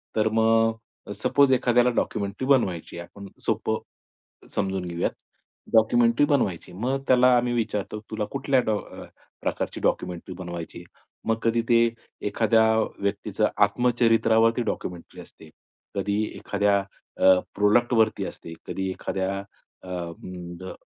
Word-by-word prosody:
तर 110 Hz, 0 st, +2 dB
मग 115 Hz, -1 st, 0 dB
सपोज 140 Hz, -2 st, +4 dB
एखाद्याला 125 Hz, -1 st, +3 dB
डॉक्युमेंटरी 105 Hz, +4 st, -2 dB
बनवायची 95 Hz, -, +1 dB
आहे, 85 Hz, 0 st, -7 dB
आपण 100 Hz, -1 st, -11 dB, 0.2 s
सोपं -, -, 0 dB, 0.8 s
समजून 95 Hz, -2 st, -1 dB
घेऊयात, 85 Hz, 0 st, -1 dB, 0.6 s
डॉक्युमेंटरी 115 Hz, +4 st, +4 dB
बनवायची. 100 Hz, -, 0 dB
मग 130 Hz, +8 st, -2 dB
त्याला 125 Hz, 0 st, +6 dB
आम्ही 120 Hz, 0 st, +1 dB
विचारतो, 105 Hz, -2 st, -2 dB
"तुला 110 Hz, -1 st, -2 dB
कुठल्या 135 Hz, -1 st, +2 dB
डॉ 105 Hz, -1 st, +1 dB
अ, -, -, -11 dB, 0.4 s
प्रकारची -, -, -3 dB
डॉक्युमेंटरी 90 Hz, +1 st, -2 dB
बनवायची 85 Hz, -2 st, -7 dB
आहे?" 85 Hz, -, -17 dB, 0.2 s
मग 115 Hz, 0 st, +2 dB
कधी 115 Hz, 0 st, +2 dB
ते 115 Hz, -, +6 dB, 0.5 s
एखाद्या 110 Hz, +1 st, +3 dB, 0.4 s
व्यक्तीचं 100 Hz, +1 st, 0 dB
आत्मचरित्रावरती 115 Hz, -1 st, +3 dB
डॉक्युमेंटरी 90 Hz, -6 st, -5 dB
असते, 80 Hz, -, -15 dB, 0.5 s
कधी 100 Hz, +2 st, 0 dB
एखाद्या 100 Hz, 0 st, +1 dB, 0.4 s
अ, 95 Hz, -1 st, +6 dB, 0.2 s
प्रोडक्टवरती 110 Hz, +2 st, +3 dB
असते, 80 Hz, -, -9 dB
कधी 95 Hz, 0 st, -3 dB
एखाद्या 95 Hz, +1 st, -3 dB, 0.4 s
अ, 90 Hz, -, -12 dB, 0.7 s
ग 95 Hz, -, -7 dB
110 Hz, 120 wpm, -25 LUFS, 95-120 Hz, 0.8 s, त्याला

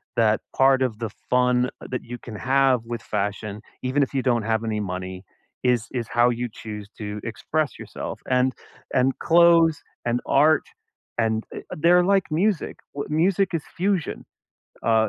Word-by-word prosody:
that 110 Hz, -2 st, +3 dB
part 135 Hz, 0 st, +5 dB
of 115 Hz, -4 st, -2 dB
the 115 Hz, -2 st, -3 dB, 0.2 s
fun 125 Hz, 0 st, +3 dB, 0.2 s
that 125 Hz, -, -3 dB
you 120 Hz, +1 st, -7 dB
can 115 Hz, -2 st, -9 dB
have 130 Hz, +1 st, +3 dB
with 120 Hz, 0 st, -5 dB
fashion, 105 Hz, 0 st, -3 dB, 0.2 s
even 130 Hz, +3 st, +1 dB
if 135 Hz, -, -4 dB
you 135 Hz, -, +1 dB
don't 120 Hz, -3 st, +1 dB
have 110 Hz, +1 st, 0 dB
any 110 Hz, -2 st, -1 dB
money, 95 Hz, -1 st, -5 dB, 0.4 s
is 125 Hz, -3 st, +2 dB
is 120 Hz, -3 st, -3 dB
how 120 Hz, +1 st, +3 dB
you 120 Hz, 0 st, -2 dB
choose 105 Hz, -2 st, -7 dB
to 105 Hz, -1 st, -4 dB
express 145 Hz, +6 st, -2 dB
yourself, -, -, -6 dB
and 130 Hz, 0 st, +3 dB, 0.4 s
and 130 Hz, +1 st, +2 dB
clothes 165 Hz, -2 st, +5 dB, 0.2 s
and 120 Hz, 0 st, +1 dB
art, 150 Hz, +2 st, +5 dB, 0.6 s
and, 110 Hz, -1 st, +1 dB
eh, -, -, -5 dB, 0.2 s
they're 175 Hz, +3 st, +5 dB
like 195 Hz, +1 st, +3 dB
music. 175 Hz, +3 st, 0 dB, 0.2 s
W 140 Hz, -, -5 dB
music 185 Hz, +5 st, +2 dB
is 160 Hz, -, -2 dB
fusion. 190 Hz, -2 st, -1 dB, 0.6 s
Uh, 110 Hz, -1 st, +3 dB
125 Hz, 165 wpm, -24 LUFS, 110-150 Hz, 0.6 s, part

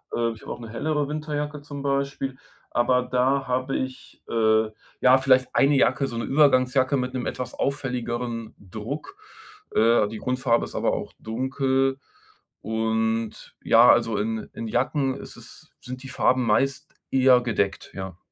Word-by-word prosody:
Äh, 115 Hz, 0 st, +1 dB
ich 110 Hz, -, -15 dB
habe -, -, -7 dB
auch -, -, -6 dB
'ne 115 Hz, -2 st, -9 dB
hellere 150 Hz, +6 st, -1 dB
Winterjacke 150 Hz, -1 st, -4 dB
zum 145 Hz, -1 st, -8 dB
Beispiel, 140 Hz, -1 st, -2 dB, 0.3 s
aber 125 Hz, +1 st, +2 dB
da 130 Hz, +2 st, +1 dB
habe 130 Hz, +2 st, -1 dB
ich, 130 Hz, 0 st, -7 dB
äh, 110 Hz, -1 st, +3 dB, 0.3 s
ja, 130 Hz, +1 st, +6 dB
vielleicht 130 Hz, -1 st, +3 dB
1 140 Hz, +1 st, +4 dB
Jacke, 135 Hz, +1 st, +2 dB
so 120 Hz, -, -6 dB
'ne 115 Hz, -, -2 dB
Übergangsjacke 130 Hz, -1 st, +3 dB
mit 125 Hz, 0 st, -2 dB
'nem 125 Hz, -2 st, -3 dB
etwas 125 Hz, -1 st, -4 dB
auffälligeren 120 Hz, -4 st, -3 dB
Druck. 110 Hz, -, -7 dB, 0.6 s
Äh, 115 Hz, -1 st, +4 dB
die 110 Hz, +1 st, -7 dB
Grundfarbe 125 Hz, -2 st, +1 dB
ist -, -, -11 dB
aber -, -, +1 dB
auch -, -, -4 dB
dunkel 130 Hz, +3 st, 0 dB, 0.6 s
und 110 Hz, 0 st, -2 dB
ja, 115 Hz, +2 st, +6 dB
also 115 Hz, -3 st, +2 dB
in 110 Hz, +1 st, -3 dB
in 115 Hz, -, -5 dB
Jacken 130 Hz, +3 st, 0 dB
ist -, -, -10 dB
es -, -, -15 dB
sind 130 Hz, +2 st, -8 dB
die 135 Hz, -, -8 dB
Farben 130 Hz, -1 st, +2 dB
meist 135 Hz, +5 st, 0 dB, 0.2 s
eher 130 Hz, -1 st, +5 dB
gedeckt, 105 Hz, -5 st, -2 dB
ja. 95 Hz, -2 st, -6 dB
125 Hz, 155 wpm, -25 LUFS, 115-135 Hz, 0.6 s, ja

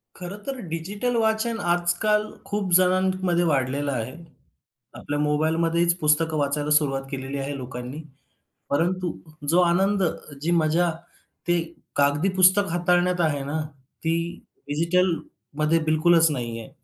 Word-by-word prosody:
खरं 180 Hz, +3 st, -7 dB
तर 275 Hz, -1 st, -4 dB
डिजिटल 200 Hz, +9 st, -2 dB
वाचन 225 Hz, +1 st, +1 dB
आजकाल 175 Hz, +5 st, +1 dB, 0.2 s
खूप 205 Hz, -3 st, -2 dB
जणांमध्ये 185 Hz, -1 st, +2 dB
वाढलेलं 140 Hz, -1 st, 0 dB
आहे. 125 Hz, +1 st, -4 dB, 0.8 s
आपल्या 145 Hz, 0 st, -4 dB
मोबाईलमध्येच 165 Hz, +3 st, +1 dB
पुस्तकं 155 Hz, +1 st, +2 dB
वाचायला 145 Hz, +1 st, -1 dB
सुरुवात 140 Hz, -3 st, +2 dB
केलेली 135 Hz, 0 st, -4 dB
आहे 140 Hz, +1 st, -3 dB
लोकांनी. 125 Hz, +3 st, -7 dB, 0.7 s
परंतु 175 Hz, +4 st, 0 dB, 0.4 s
जो 170 Hz, +3 st, +4 dB
आनंद, 190 Hz, +3 st, +2 dB, 0.4 s
जी 165 Hz, +3 st, 0 dB
मजा 170 Hz, +1 st, +2 dB, 0.6 s
ते 175 Hz, -1 st, +2 dB, 0.3 s
कागदी 145 Hz, +6 st, +2 dB
पुस्तक 190 Hz, +2 st, +5 dB
हाताळण्यात 175 Hz, +1 st, +2 dB
आहे 145 Hz, -4 st, 0 dB
ना, 145 Hz, +3 st, -3 dB, 0.4 s
ती 165 Hz, 0 st, +1 dB, 0.5 s
डिजिटलमध्ये 165 Hz, -1 st, 0 dB
बिलकुलच 160 Hz, +1 st, +4 dB
नाही 120 Hz, -4 st, -4 dB
आहे. 115 Hz, -, -10 dB
165 Hz, 120 wpm, -24 LUFS, 145-180 Hz, 0.8 s, पुस्तक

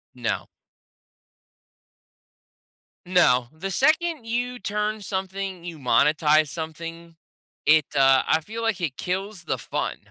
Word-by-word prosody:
No. -, -, -2 dB, 2.6 s
No. 130 Hz, -10 st, +4 dB
The 175 Hz, +5 st, -5 dB
second 310 Hz, -, +2 dB
you 245 Hz, +2 st, -2 dB
turn 210 Hz, 0 st, -2 dB
something 190 Hz, -2 st, -4 dB
you 170 Hz, -2 st, -7 dB
monetize 150 Hz, +4 st, +3 dB
something, 165 Hz, +2 st, -7 dB, 0.5 s
it, 150 Hz, -1 st, +5 dB
uh, 135 Hz, -1 st, +5 dB
I 160 Hz, -, +3 dB
feel 220 Hz, +8 st, -7 dB
like 220 Hz, -5 st, 0 dB
it 145 Hz, -6 st, -2 dB
kills 190 Hz, +1 st, -3 dB
the 155 Hz, -, -2 dB
fun. -, -, -3 dB
175 Hz, 115 wpm, -24 LUFS, 155-210 Hz, 2.6 s, it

